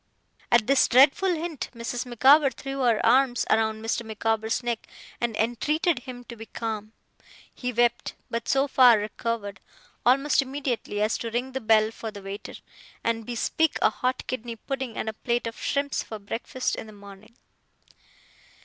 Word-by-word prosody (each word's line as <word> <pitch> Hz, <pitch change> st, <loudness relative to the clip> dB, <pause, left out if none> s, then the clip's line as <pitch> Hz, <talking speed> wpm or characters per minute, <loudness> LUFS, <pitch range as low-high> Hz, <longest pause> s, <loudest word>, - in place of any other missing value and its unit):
At 235 Hz, -2 st, +5 dB
this 275 Hz, +2 st, +4 dB
dreadful 275 Hz, +9 st, +5 dB
hint 320 Hz, -3 st, -4 dB
Mrs. 235 Hz, +2 st, -4 dB
Micawber 270 Hz, +4 st, +5 dB
threw 270 Hz, 0 st, -6 dB
her 235 Hz, -4 st, +2 dB
arms 245 Hz, +1 st, +3 dB
round 220 Hz, 0 st, +1 dB
Mr. 235 Hz, +1 st, -1 dB
Micawber's 220 Hz, +1 st, -1 dB
neck 235 Hz, -2 st, -3 dB, 0.3 s
and 235 Hz, -2 st, -1 dB
entreated 290 Hz, +7 st, +1 dB
him 250 Hz, -1 st, -9 dB
to 235 Hz, -, -10 dB
be 225 Hz, 0 st, -10 dB
calm. 220 Hz, -1 st, -5 dB, 0.6 s
He 250 Hz, -1 st, -4 dB
wept; 240 Hz, 0 st, +1 dB
but 230 Hz, 0 st, -4 dB
so 270 Hz, +1 st, +3 dB
far 250 Hz, -4 st, +6 dB
recovered, 210 Hz, -1 st, -4 dB, 0.4 s
almost 275 Hz, +4 st, +4 dB
immediately, 260 Hz, -6 st, -3 dB
as 215 Hz, -, 0 dB
to 230 Hz, -, -4 dB
ring 245 Hz, +3 st, -2 dB
the 265 Hz, 0 st, -4 dB
bell 220 Hz, -1 st, +4 dB
for 225 Hz, 0 st, -6 dB
the 205 Hz, -2 st, -10 dB
waiter, 195 Hz, +1 st, -7 dB, 0.5 s
and 225 Hz, -1 st, -1 dB
bespeak 285 Hz, +6 st, 0 dB
a -, -, +5 dB
hot 255 Hz, 0 st, -2 dB
kidney 240 Hz, -2 st, -4 dB
pudding 265 Hz, +1 st, -5 dB
and -, -, -3 dB
a 220 Hz, -, -2 dB
plate 235 Hz, +2 st, -1 dB
of 230 Hz, 0 st, -6 dB
shrimps 280 Hz, -1 st, -1 dB
for 220 Hz, -, -7 dB
breakfast 225 Hz, +5 st, -3 dB
in -, -, -7 dB
the 215 Hz, -, -12 dB
morning. 200 Hz, +2 st, -14 dB
235 Hz, 165 wpm, -26 LUFS, 220-260 Hz, 0.6 s, far